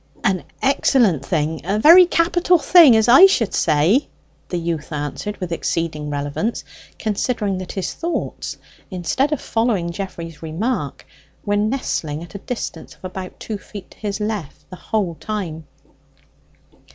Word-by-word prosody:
"An 190 -5 0 0.2
excellent 255 - +3
thing 160 -3 -1
a 195 +5 -1
very 340 +10 +8
capital 350 +1 +3
thing, 325 -6 +7
as 220 -1 +3
I 270 +11 +9
should 235 - 0
say," 165 - +2 0.4
the 180 - -2
youth 165 -2 -3
answered 150 +8 -4
with 180 -2 -5
exceeding 160 -2 -2
relevance, 145 +10 -3 0.3
considering 210 -2 -1
that 185 - -7
his 190 -3 -3
thoughts, 340 +1 -4 0.3
instead 190 - -1
of 300 - 0
following 225 -7 -1
Geoffrey's 170 -4 -7
remark, 175 +11 -3 0.4
were 205 -1 +1
nestling 205 - -2
at 170 - -13
a 200 - -6
distance 245 +4 -6
of - - -14
about 185 0 -7
two 215 -2 -5
feet 195 0 -11
on - - -27
his 205 -1 -3
left 210 -8 -5
the - - -7
whole 195 -2 -2
time. 165 -8 -5
195 Hz, 145 wpm, -20 LUFS, 165-230 Hz, 0.4 s, I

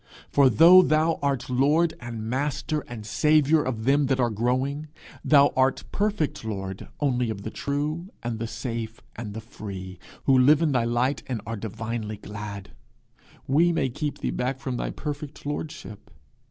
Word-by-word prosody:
For 140 -2 +5
though 170 - +8
thou 160 -1 +2
art 135 -3 0
lord 150 +6 +2
and 115 -2 -6
master 140 +4 -1
and 115 -3 -8
saviour 150 +5 +3
of 120 -5 -3
them 140 +1 +3
that 135 0 +1
are 120 -2 +2
growing, 130 +7 -1 0.4
thou 140 -1 +5
art 130 0 +2
perfect 205 - -1
lord 95 -3 -5
only 125 -5 +1
of 100 -2 -5
the 110 - -5
true 150 +5 -3
and 120 -1 -3
the 115 - -3
safe 115 -2 -5
and 110 -3 -6
the 110 - -5
free, 95 -5 -8 0.2
who 135 - +4
live 145 +5 +5
in 155 - +2
thy 125 -3 +2
light 120 +4 0
and 125 -4 -2
are 115 - -4
divinely 110 0 -4
glad: 100 -1 -8 0.7
we 160 0 +2
keep 150 +3 -3
thee - - -1
back 125 +2 -2
from 130 -2 -3
thy - - -2
perfect 145 -1 -6
lordship. 145 -8 -6
130 Hz, 165 wpm, -25 LUFS, 115-150 Hz, 0.7 s, though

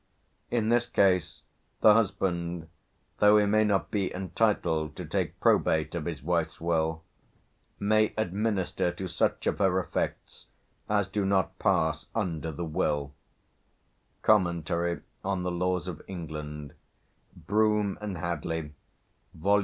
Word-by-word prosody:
In 115 -2 0
this 120 0 +3
case 90 -7 +2 0.4
the 105 - +8
husband, 90 -6 0 0.5
though 105 0 +7
he 105 - +4
may 110 +1 +3
not 100 -2 +1
be 100 -3 0
entitled 90 -5 0
to - - -6
take - - -2
probate - - +2
of - - -3
his - - -5
wife's 85 -1 -1
will, 80 -1 0 0.8
may 110 +1 +3
administer 100 -3 0
to 95 +1 -5
such - - 0
of - - 0
her 95 -2 +3
effects 90 - -4 0.4
as 100 -2 +2
do 100 +1 -1
not 95 -1 +1
pass - - +1
under 80 -7 -2
the 85 +3 -4
will" 75 -3 -1 1.1
("Comm, 85 -3 +2 0.3
on 95 -2 -1
the 90 - -1
Laws 90 0 -1
of 85 -4 -6
England," 75 -4 -6 0.7
Broom 105 0 +2
and 100 -4 -4
Hadley, 80 -2 -3 0.6
vol. 100 +5 +3
90 Hz, 130 wpm, -28 LUFS, 85-105 Hz, 1.1 s, the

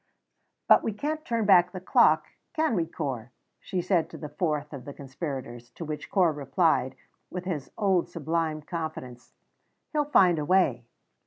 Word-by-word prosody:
"But - - +7
we 225 - -2
can't 305 +8 -3
turn 230 -7 -1
back 180 -3 +6
the 185 - -5
clock, 180 - +4 0.3
can 315 -5 +1
we, 170 -6 0
Corp?" 130 -8 -4 0.3
she 180 -2 -3
said 180 -3 +1
to - - -9
the 150 - -7
fourth 150 -1 -2
of 135 -3 -7
the 140 +2 -9
conspirators, 130 -4 -6
to 165 - -6
which 155 -1 -6
Corp 175 -6 +3
replied, 140 -3 +1 0.3
with 180 0 -6
his 155 -7 -4
old 190 -4 +2
sublime 160 -1 -2
confidence, 155 -7 -6 0.6
"He'll 300 -1 +1
find 185 - +4
a 150 - -2
way." 145 -10 +2
165 Hz, 165 wpm, -27 LUFS, 145-185 Hz, 0.6 s, But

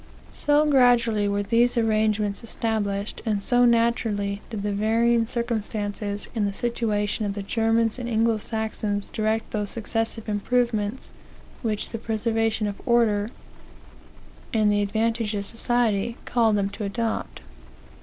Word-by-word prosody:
"So 295 +1 +2
gradually 240 -7 +4
were 200 0 0
these 235 +4 +2
arrangements 215 -2 +1
established, 210 -3 -2
and 215 -2 0
so 245 +4 +3
naturally 225 -4 +1
did 215 -4 -5
the 205 - -1
varying 225 +3 +2
circumstances 210 -3 -3
in 220 -3 0
the 200 - -1
situation 215 -2 -1
of 200 -1 -2
the 200 - -4
Germans 225 +2 +1
and 240 -1 -4
Anglo 225 0 +2
Saxons 215 -2 -3
direct 220 +1 -1
those 210 -2 -2
successive 225 0 -3
improvements 220 +1 -1 0.5
which 215 -3 -2
the 225 - -4
preservation 225 0 0
of 205 -1 -4
order, 220 -4 +3 1.2
and 215 -4 +3
the 205 0 +2
advantage 220 +1 0
of 200 0 -3
society, 230 -1 0
called 225 -3 +2
them 200 -1 +1
to 215 - -6
adopt. 205 - -3
220 Hz, 135 wpm, -25 LUFS, 205-235 Hz, 1.2 s, gradually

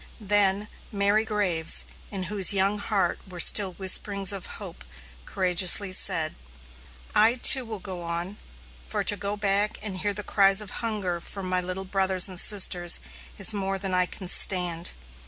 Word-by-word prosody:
Then 205 -1 0 0.2
Mary 205 +1 0
Graves, 190 -7 +1 0.2
in 195 -2 -5
whose 195 0 +3
young 200 +1 +1
heart 200 -4 -1
were 180 -1 -10
still 190 +2 +4
whisperings 195 +1 0
of 195 -2 -7
hope, 60 - -10 0.4
courageously 185 +1 +3
said: 165 -5 +4 0.8
"I, 225 +3 +3
too, 255 +1 +7
will 220 -1 -7
go 185 -2 -8
on, 170 +4 -6 0.4
for 60 - -5
to 205 - +4
go 205 +1 -5
back 205 0 -2
and 200 -3 -5
hear 205 +2 -2
the 210 - -4
cries 195 -1 +3
of 210 -2 -4
hunger 205 -7 -3
from 195 +1 -7
my 185 0 0
little 185 +1 -6
brothers 190 -1 0
and 185 -2 -5
sisters 180 -4 +3 0.4
is - - 0
more 195 -1 -4
than 190 -1 -6
I 180 0 0
can 185 - -10
stand. 175 -2 +1
195 Hz, 160 wpm, -24 LUFS, 180-205 Hz, 0.8 s, too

